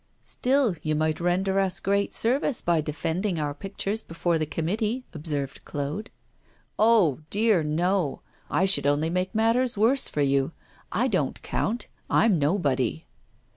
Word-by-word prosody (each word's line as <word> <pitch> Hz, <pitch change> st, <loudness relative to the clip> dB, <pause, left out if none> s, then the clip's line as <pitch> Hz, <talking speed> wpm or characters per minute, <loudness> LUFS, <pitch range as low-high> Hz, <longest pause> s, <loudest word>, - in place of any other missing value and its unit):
'Still, 255 Hz, -6 st, +1 dB
you 155 Hz, 0 st, -1 dB
might 155 Hz, 0 st, 0 dB
render 190 Hz, +3 st, +1 dB
us 190 Hz, -1 st, +1 dB
great 200 Hz, +1 st, 0 dB
service 255 Hz, +2 st, +1 dB
by 170 Hz, -2 st, +1 dB
defending 165 Hz, +4 st, -2 dB
our 145 Hz, -1 st, -1 dB
pictures 200 Hz, +6 st, -3 dB
before 165 Hz, -1 st, -1 dB
the 155 Hz, -, -1 dB
committee,' 210 Hz, -, -1 dB
observed 145 Hz, -4 st, -4 dB
Claude. 145 Hz, +10 st, -4 dB, 0.7 s
'Oh, 210 Hz, -, +4 dB
dear, 210 Hz, -3 st, +3 dB
no! 165 Hz, +1 st, 0 dB, 0.3 s
I 190 Hz, -, +2 dB
should 190 Hz, -7 st, +2 dB
only 150 Hz, +3 st, +1 dB
make 185 Hz, +3 st, -1 dB
matters 230 Hz, +2 st, +2 dB
worse 245 Hz, +6 st, +3 dB
for 150 Hz, -, -2 dB
you 140 Hz, +2 st, +1 dB, 0.4 s
I 235 Hz, +7 st, +1 dB
don't 185 Hz, -, -1 dB
count; 225 Hz, +2 st, -2 dB, 0.2 s
I'm 210 Hz, -7 st, +3 dB
nobody. 140 Hz, -, 0 dB
180 Hz, 140 wpm, -26 LUFS, 155-215 Hz, 0.7 s, Oh